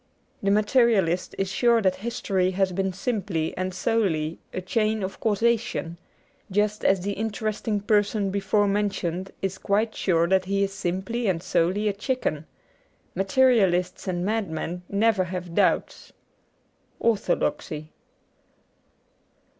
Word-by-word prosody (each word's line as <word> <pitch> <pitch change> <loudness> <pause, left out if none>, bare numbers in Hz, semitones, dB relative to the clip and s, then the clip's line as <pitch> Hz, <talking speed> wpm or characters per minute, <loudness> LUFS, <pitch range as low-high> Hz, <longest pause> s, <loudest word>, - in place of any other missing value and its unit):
The 195 - +1
Materialist 210 -4 +2
is 195 - 0
sure 235 +4 +3
that 190 -4 +1
history 195 -4 -1
has 190 -1 +2
been 190 +1 -1
simply 190 -6 -2
and 185 0 -2
solely 180 -6 0
a - - -3
chain 215 +3 0
of 190 0 -5
causation, 220 -6 0 0.5
just 210 +2 0
as 190 -1 +3
the 200 +3 -2
interest 215 +1 -3
ing 210 -2 +1
person 205 -1 +1
before 200 +1 +1
mentioned 195 -3 -1
is 190 0 -2
quite 215 +2 +1
sure 170 -3 +1
that 190 0 +2
he 200 +1 +1
is 195 0 -2
simply 195 +6 -2
and 175 -3 0
solely 190 +3 +1
a 205 - +1
chicken. 200 - -2 0.7
Materialists 195 -4 +2
and 175 -1 -1
madmen 180 -5 -2
never 205 -2 +2
have 180 -1 -6
doubts. - - 0 0.9
^Orthodoxy.' 215 - -1
195 Hz, 125 wpm, -25 LUFS, 185-215 Hz, 0.9 s, sure